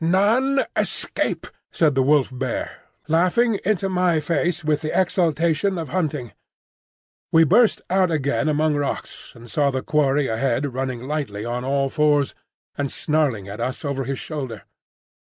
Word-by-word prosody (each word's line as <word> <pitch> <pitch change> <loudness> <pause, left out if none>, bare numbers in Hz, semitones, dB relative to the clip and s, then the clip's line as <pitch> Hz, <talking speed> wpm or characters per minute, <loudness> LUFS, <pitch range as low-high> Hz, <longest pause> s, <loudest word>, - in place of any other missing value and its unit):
"None 225 +11 +3
escape," - - 0 0.3
said 155 -3 +2
the 135 - +2
Wolf 140 0 +3
bear, 125 -1 -4 0.2
laughing 185 +7 +2
into 200 -1 +1
my 180 -3 +2
face 165 +3 -1
with 150 -1 +1
the 155 +3 0
exultation 175 +1 +1
of 160 -4 -4
hunting. 150 -8 -2 1.0
We 165 0 +6
burst 215 +8 +3
out 185 0 +2
again 150 -1 0
among 155 +1 +2
rocks, 145 -1 -4
and 120 0 -13
saw 145 +3 +1
the 130 -1 -3
quarry 145 -1 +2
ahead 130 +3 -1
running 130 -2 -3
lightly 135 -9 -3
on 120 +1 -3
all 135 +1 +1
fours 145 -1 +2 0.4
and 140 -2 -2
snarling 145 -10 0
at 100 +1 -7
us 130 +6 -3
over 135 -2 -2
his 135 +1 -3
shoulder. 130 -9 -6
150 Hz, 150 wpm, -22 LUFS, 135-170 Hz, 1.0 s, We